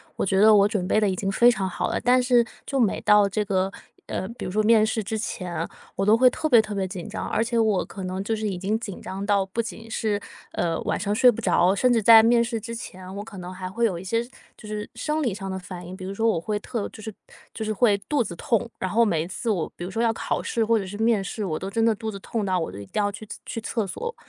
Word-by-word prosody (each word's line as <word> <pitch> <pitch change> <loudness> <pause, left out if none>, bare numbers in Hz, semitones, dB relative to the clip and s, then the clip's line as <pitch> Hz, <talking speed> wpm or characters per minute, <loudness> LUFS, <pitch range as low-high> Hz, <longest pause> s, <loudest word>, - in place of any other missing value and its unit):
我 - - -1
觉 190 0 +2
得 215 0 +7
我 200 0 +6
准 205 -4 -2
备 215 - +3
得 210 - +2
已 190 - 0
经 195 +1 -2
非 240 +5 +6
常 190 -4 -2
好 - - -2
了， - - -2
但 250 +1 +4
是 245 -1 +4 0.2
就 275 - -1
每 225 -6 +2
到 210 -1 +5
这 210 +1 -1
个 190 -1 0 0.4
呃， 190 - -3
比 235 - -7
如 180 - -4
说 215 - +2
面 220 0 +5
试 220 -1 -1
之 220 +3 -3
前， 180 -5 -4 0.3
我 195 - 0
都 215 - +6
会 255 +2 +6
特 310 - -2
别 235 -5 +7
特 215 -1 -6
别 190 -1 -1
紧 180 -2 -7
张。 - - -4
而 - - +1
且 235 0 -1
我 215 -4 +2
可 195 - -8
能 185 +1 -3
就 220 +2 -1
是 215 0 -2
已 195 - -2
经 200 +5 -1
紧 205 -5 -7
张 195 +1 -5
到 200 -1 +3
不 190 +5 -6
仅 225 0 -8
是， 215 -2 -1 0.3
呃， 165 -1 -1
晚 - - -1
上 205 -1 -1
睡 250 +4 +6
不 230 - -6
着， 180 -3 +3
甚 250 +5 +2
至 230 -2 +2
在 225 +1 +9
面 235 +1 +4
试 235 -1 -3
之 230 +2 -6
前， 185 -5 -8
我 205 - -5
可 205 -3 -10
能 180 0 -7
还 185 0 -6
会 220 +6 -3
有 185 -6 0
一 175 - -8
些 230 +5 0 0.3
就 215 - -12
是 210 0 -4
生 305 0 -2
理 235 -8 0
上 195 -1 -6
的 190 - -3
反 180 -1 -8
应。 185 +1 -8
比 185 - -7
如 195 - -4
说 225 +3 +1
我 175 - +1
会 210 +4 -2
特 225 0 -4
就 215 - -12
是 220 +1 -6 0.4
就 220 - -5
是 215 - -1
会 210 -1 +3
肚 290 -5 +2
子 175 - -6
痛， 230 +6 0
然 185 - -3
后 235 +2 +4
每 165 -8 +1
一 - - -7
次 230 +6 -4
我 185 -7 0
比 - - -7
如 180 - -4
说 225 +5 -1
要 230 -1 +2
考 - - -2
试 230 - 0
或 225 +1 +3
者 200 - -2
是 190 +2 -7
面 225 -3 +2
试， 205 +2 -4
我 160 -5 -2
都 190 - -5
真 225 +3 0
的 225 -1 +3
肚 220 0 -4
子 200 - -8
痛 215 +2 -3
到 185 -2 +1
我 160 - -3
都 95 - -9
一 100 - -8
定 210 - -2
要 205 0 +1
去 215 +1 -10 0.2
去 - - -4
厕 225 -2 -2
所。 470 - -5
210 Hz, 320 characters per minute, -24 LUFS, 190-230 Hz, 0.4 s, 在